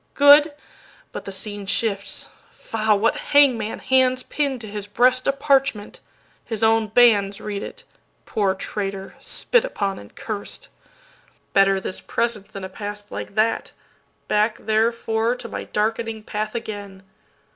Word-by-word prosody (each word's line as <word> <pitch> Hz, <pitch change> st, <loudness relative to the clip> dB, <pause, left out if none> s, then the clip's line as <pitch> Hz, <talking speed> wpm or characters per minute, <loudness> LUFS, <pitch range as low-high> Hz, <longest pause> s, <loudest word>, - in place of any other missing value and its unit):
Good—but 290 Hz, +11 st, +3 dB
the 195 Hz, -, -5 dB
scene 205 Hz, +1 st, -5 dB
shifts—faugh! 210 Hz, +1 st, -1 dB
what 225 Hz, +3 st, +1 dB
hangman 255 Hz, -7 st, +3 dB
handsPin 260 Hz, +2 st, +1 dB
to 220 Hz, -, -8 dB
his 205 Hz, -1 st, -5 dB
breast 250 Hz, +4 st, +3 dB
a -, -, +5 dB
parchment? 270 Hz, -6 st, +1 dB, 0.4 s
His 225 Hz, -1 st, -4 dB
own 225 Hz, -1 st, +3 dB
bandsRead 205 Hz, -3 st, +3 dB
it. -, -, -8 dB, 0.4 s
Poor 195 Hz, -3 st, 0 dB
traitor, 195 Hz, 0 st, -5 dB
spit -, -, +1 dB
upon 200 Hz, -, -2 dB
and 100 Hz, -, -14 dB
curst! 205 Hz, -2 st, -6 dB, 0.8 s
Better 195 Hz, 0 st, +4 dB
this 190 Hz, -, -6 dB
present 230 Hz, -4 st, -2 dB
than 195 Hz, -, -9 dB
a -, -, -3 dB
past 205 Hz, +2 st, -7 dB
like -, -, -6 dB
that; 220 Hz, +1 st, +1 dB, 0.5 s
Back 215 Hz, +1 st, +2 dB
therefore 225 Hz, +1 st, +1 dB
to 245 Hz, -, -7 dB
my -, -, -6 dB
darkening 220 Hz, +1 st, -2 dB
path 215 Hz, +1 st, -4 dB
again! 205 Hz, -4 st, -6 dB
215 Hz, 125 wpm, -22 LUFS, 205-240 Hz, 0.8 s, a